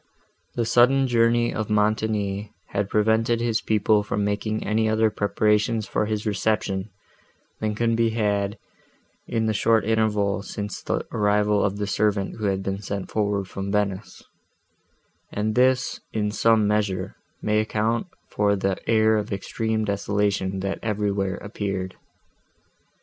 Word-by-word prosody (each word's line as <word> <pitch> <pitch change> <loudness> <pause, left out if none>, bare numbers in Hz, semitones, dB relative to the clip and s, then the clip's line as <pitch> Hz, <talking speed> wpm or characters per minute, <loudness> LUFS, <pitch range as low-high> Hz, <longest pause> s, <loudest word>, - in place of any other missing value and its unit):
The 120 - 0
sudden 125 +4 +4
journey 120 -1 +2
of 110 -1 -3
Montoni 105 -1 0 0.2
had 100 -1 -2
prevented 110 +2 +2
his 115 -2 0
people 105 0 +2
from 105 0 -2
making 105 +1 -2
any 110 +1 +1
other 110 0 +2
preparations 105 +2 +1
for 105 - -1
his 110 0 -2
reception, 105 -2 -1 0.7
than 105 -1 -1
could 115 +1 +1
be 115 0 +2
had 105 -2 0 0.7
in 115 -1 0
the 110 - +1
short 110 +1 +2
interval, 105 -2 +1
since 105 0 -6
the - - -2
arrival 105 -1 +2
of 100 0 0
the 105 - -1
servant, 100 -1 0
who 110 - -3
had 95 -1 0
been 95 +1 -3
sent 100 -2 -5
forward 100 -2 0
from 95 +1 -5
Venice; 100 -1 -2 1.1
and 105 +1 -1
this, 130 +1 +2
in 105 -1 -1
some 110 0 +3
measure, 100 -3 -1 0.2
may 105 0 +1
account 110 - 0 0.2
for 105 0 +2
the 95 -1 -1
air 110 -1 +4
of 105 0 -3
extreme 110 +2 -2
desolation, 100 -1 -1
that 100 0 -3
everywhere 100 -3 -1
appeared. 100 -3 -4
105 Hz, 140 wpm, -24 LUFS, 100-110 Hz, 1.1 s, sudden